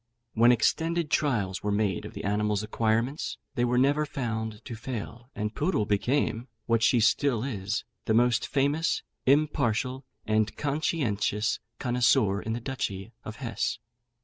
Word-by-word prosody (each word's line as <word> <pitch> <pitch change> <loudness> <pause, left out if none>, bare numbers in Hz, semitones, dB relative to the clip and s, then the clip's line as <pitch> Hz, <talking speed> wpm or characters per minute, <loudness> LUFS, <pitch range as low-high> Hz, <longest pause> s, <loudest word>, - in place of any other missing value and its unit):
When 120 +2 +6
extended 165 +7 +1
trials 105 -10 +1
were 105 - -1
made 100 -3 0
of - - -9
the - - -6
animal's 105 0 0
acquirements, 115 +6 0 0.2
they 120 -3 0
were 125 0 +2
never 140 +4 +3
found 110 -6 -4
to 120 - -6
fail, 120 +1 -6
and 105 +1 -2
Poodle 150 - 0
became, 120 +3 0 0.2
what 115 -1 +2
she 120 +2 +4
still 115 +2 +2
is, 105 -6 -2 0.2
the 110 - +2
most 120 0 +3
famous, 145 +4 +1 0.2
impartial, 130 -3 +2 0.2
and 110 0 +1
conscientious 120 -8 0 0.2
connoisseur 120 -5 +2
in 110 - -3
the 115 - -2
Duchy 115 -5 -4
of 110 - -7
Hesse. 115 -6 -2
115 Hz, 145 wpm, -28 LUFS, 105-135 Hz, 0.2 s, When